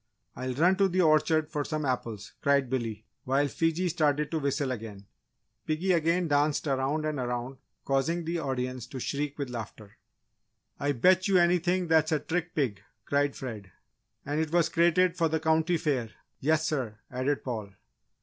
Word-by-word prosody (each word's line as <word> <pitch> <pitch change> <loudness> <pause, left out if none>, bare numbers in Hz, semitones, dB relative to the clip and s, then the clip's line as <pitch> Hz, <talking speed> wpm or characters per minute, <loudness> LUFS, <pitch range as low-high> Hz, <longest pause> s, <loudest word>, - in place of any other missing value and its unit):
"I'll 130 0 -4
run 180 +6 +4
to 200 -1 +4
the 185 0 +1
orchard 155 -1 +3
for 150 -2 -1
some 155 0 -3
apples!" 120 -5 -3
cried 140 -3 +2
Billy, 115 -4 -3 0.2
while 135 +2 +2
Fiji 165 +5 0
started 150 -2 +1
to 160 - 0
whistle 140 -1 -1
again. 105 -5 -7 0.6
Piggy 165 +5 0
again 170 +1 +2
danced 145 +1 +1
around 140 +2 0
and 155 -2 -2
around 125 +1 -3 0.3
causing 150 +5 0
the 170 +1 -1
audience 130 -3 -3
to 130 - -7
shriek 145 +3 -3
with 140 -4 -4
laughter. 110 -3 -8 0.8
"I 145 0 +1
bet 185 - +4
you 195 -2 +4
anything 175 +1 +2
that's 160 0 +3
a 155 - +3
trick 170 +4 -3
pig!" 125 -10 -1 0.2
cried 145 0 +1
Fred. 105 -8 -7 0.5
"And 145 +2 -1
it 160 -1 -1
was 170 -1 +3
crated 175 +2 +3
for 165 -2 +2
the 160 +1 0
County 160 +2 +2
Fair 135 -8 -1 0.3
yes 155 +2 +2
sir!" 130 -10 -2
added 130 +3 -1
Paul. 110 -6 -5
145 Hz, 170 wpm, -28 LUFS, 130-165 Hz, 0.8 s, run